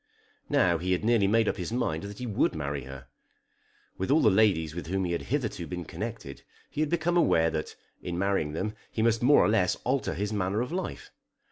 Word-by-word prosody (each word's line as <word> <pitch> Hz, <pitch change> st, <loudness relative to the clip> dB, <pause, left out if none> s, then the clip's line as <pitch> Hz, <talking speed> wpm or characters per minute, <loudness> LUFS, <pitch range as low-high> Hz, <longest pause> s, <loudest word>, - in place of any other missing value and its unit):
Now 85 Hz, -2 st, +3 dB
he 90 Hz, +2 st, 0 dB
had 90 Hz, -, -1 dB
nearly 115 Hz, -4 st, +3 dB
made 110 Hz, +2 st, +3 dB
up -, -, 0 dB
his 90 Hz, +2 st, -4 dB
mind 100 Hz, -10 st, -1 dB
that 100 Hz, +1 st, -8 dB
he 125 Hz, -, -5 dB
would 105 Hz, -7 st, +1 dB
marry 70 Hz, -3 st, -3 dB
her. 65 Hz, -1 st, -9 dB, 0.9 s
With 95 Hz, -, -2 dB
all 155 Hz, +3 st, +4 dB
the 110 Hz, -, +6 dB
ladies 95 Hz, -7 st, +3 dB
with 85 Hz, -1 st, -6 dB
whom 95 Hz, +2 st, -1 dB
he 85 Hz, -, -2 dB
had 85 Hz, -, -1 dB
hitherto 115 Hz, -, -2 dB
been 90 Hz, -1 st, -5 dB
connected 70 Hz, -1 st, -6 dB, 0.3 s
he 150 Hz, -, -2 dB
had 155 Hz, -, +1 dB
become 170 Hz, +1 st, +1 dB
aware 80 Hz, -, +3 dB
that, -, -, -4 dB, 0.3 s
in 85 Hz, -1 st, -4 dB
marrying 95 Hz, -6 st, 0 dB
them, 105 Hz, +6 st, -2 dB, 0.2 s
he 110 Hz, -, -1 dB
must 115 Hz, -1 st, +2 dB
more 140 Hz, +4 st, +6 dB
or -, -, +3 dB
less 105 Hz, -4 st, +2 dB
alter 130 Hz, +1 st, 0 dB
his 105 Hz, +2 st, -2 dB
manner 100 Hz, +2 st, 0 dB
of 125 Hz, -, -3 dB
life. 185 Hz, +2 st, -5 dB
100 Hz, 220 wpm, -28 LUFS, 85-115 Hz, 0.9 s, the